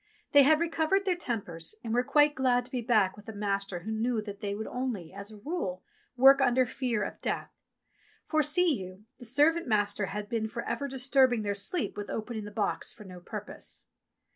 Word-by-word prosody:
They 285 Hz, -, +8 dB
had 305 Hz, +3 st, +5 dB
recovered 335 Hz, +3 st, +1 dB
their 370 Hz, -2 st, +2 dB
tempers 200 Hz, -, -5 dB
and 225 Hz, -1 st, -3 dB
were 245 Hz, +1 st, +3 dB
quite 295 Hz, +2 st, +4 dB
glad 250 Hz, -2 st, +2 dB
to 250 Hz, -, -14 dB
be 250 Hz, -, -2 dB
back 215 Hz, -5 st, +3 dB
with 210 Hz, +1 st, -12 dB
a -, -, -6 dB
master 200 Hz, -3 st, -2 dB
who 220 Hz, -, -5 dB
knew 225 Hz, +1 st, 0 dB
that 205 Hz, -1 st, -8 dB
they 200 Hz, -1 st, -2 dB
would 220 Hz, +1 st, -4 dB
only, 235 Hz, -10 st, -4 dB
as 200 Hz, +2 st, -8 dB
a 215 Hz, -, -11 dB
rule, 205 Hz, -, -4 dB, 0.3 s
work 270 Hz, +2 st, +8 dB
under 255 Hz, -1 st, +4 dB
fear 240 Hz, -3 st, -1 dB
of -, -, -6 dB
death; -, -, -2 dB, 0.8 s
for, 310 Hz, -1 st, +3 dB
see 320 Hz, +3 st, +3 dB
you, 190 Hz, -2 st, -7 dB
the 245 Hz, -, -10 dB
servant 295 Hz, +7 st, +3 dB
master 205 Hz, -2 st, +1 dB
had 205 Hz, +1 st, -4 dB
been 220 Hz, 0 st, -1 dB
for 235 Hz, +2 st, -5 dB
ever 235 Hz, +4 st, -2 dB
disturbing 260 Hz, -3 st, +2 dB
their 205 Hz, -1 st, 0 dB
sleep 205 Hz, -, -2 dB
with 205 Hz, -, -5 dB
opening 220 Hz, -1 st, -4 dB
the -, -, -6 dB
box 205 Hz, -1 st, -2 dB
to 215 Hz, -, -12 dB
no 185 Hz, -2 st, -10 dB
purpose. 175 Hz, -, -8 dB
230 Hz, 205 wpm, -29 LUFS, 205-270 Hz, 0.8 s, They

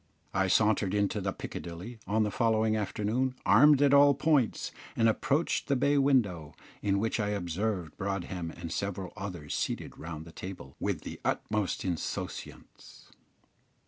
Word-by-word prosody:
I 95 Hz, 0 st, +2 dB
sauntered 105 Hz, 0 st, +3 dB
into 105 Hz, 0 st, +1 dB
"the 95 Hz, 0 st, -1 dB
Piccadilly" 90 Hz, +7 st, -7 dB
on 110 Hz, +2 st, +2 dB
the 105 Hz, -, -1 dB
following 110 Hz, 0 st, +2 dB
afternoon, 110 Hz, +5 st, -1 dB
armed 145 Hz, +5 st, +6 dB
at 140 Hz, -1 st, +5 dB
all 140 Hz, 0 st, +7 dB
points, 140 Hz, -5 st, +1 dB, 0.2 s
and 115 Hz, -, +3 dB
approached 140 Hz, +8 st, +1 dB
the 140 Hz, -, +2 dB
bay 140 Hz, +3 st, +2 dB
window, 100 Hz, -, +1 dB, 0.3 s
in 100 Hz, -1 st, +1 dB
which 110 Hz, +3 st, 0 dB
I 105 Hz, -, +1 dB
observed 90 Hz, -3 st, -2 dB
Broadhem 95 Hz, -3 st, -3 dB
and 80 Hz, 0 st, -7 dB
several 95 Hz, -1 st, -3 dB
others 90 Hz, -7 st, -6 dB
seated -, -, -3 dB
round 80 Hz, -1 st, -6 dB
the 85 Hz, -, -11 dB
table, 90 Hz, -8 st, -8 dB
with -, -, -1 dB
the -, -, -8 dB
utmost 105 Hz, -3 st, -1 dB
insouciance. 85 Hz, -4 st, -6 dB
105 Hz, 145 wpm, -30 LUFS, 90-115 Hz, 0.3 s, all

